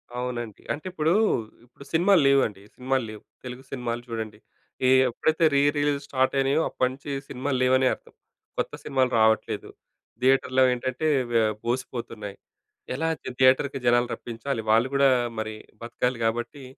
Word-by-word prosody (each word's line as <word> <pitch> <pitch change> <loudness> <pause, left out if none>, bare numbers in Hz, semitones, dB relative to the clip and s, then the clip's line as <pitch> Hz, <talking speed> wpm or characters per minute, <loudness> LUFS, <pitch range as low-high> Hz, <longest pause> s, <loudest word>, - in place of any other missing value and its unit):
అవునండి. 120 -3 -4
అంటే 155 - -8
ఇప్పుడు 160 -1 +1 0.5
ఇప్పుడు 125 +3 -16
సినిమాలు 175 +1 +5
లేవండి, 130 -8 +2
సినిమాలు 130 -1 -1
లేవు. 110 -1 -10 0.2
తెలుగు 125 +1 -7
సినిమాలు 120 -3 -3
చూడండి 110 -2 -5 0.5
ఏ - - +5 0.2
ఎప్పుడైతే 160 +7 0
రి 140 - +4 0.2
రిలీజ్ 145 -1 +1
స్టార్ట్ 130 -1 +1
అయినాయో 135 +3 +2
అప్పటినుంచి 130 +3 -2 0.2
సినిమాలు 130 +1 -2
లేవనే 130 0 +4
అర్థం. - - -13 0.4
కొత్త - - -2
సినిమాలు 130 -2 +1
రావట్లేదు, 110 0 +1 0.5
థియేటర్‌లో 130 0 +3
ఏంటంటే 130 +5 -2 0.2
వే 115 - +4 0.2
బోసిపోతున్నాయి. 115 -4 -4 0.6
ఎలా 160 +4 -1
థి - - -6
థియేటర్‌కి 130 +1 +3
జనాలు 120 0 +4
రప్పించాలి 120 +1 -4
వాళ్ళు 115 +4 +4
కూడా 140 0 +5 0.3
మరి 110 0 -4 0.3
బతకాలి 125 +1 -2
కాబట్టి 120 +5 -2
130 Hz, 135 wpm, -25 LUFS, 120-140 Hz, 0.6 s, సినిమాలు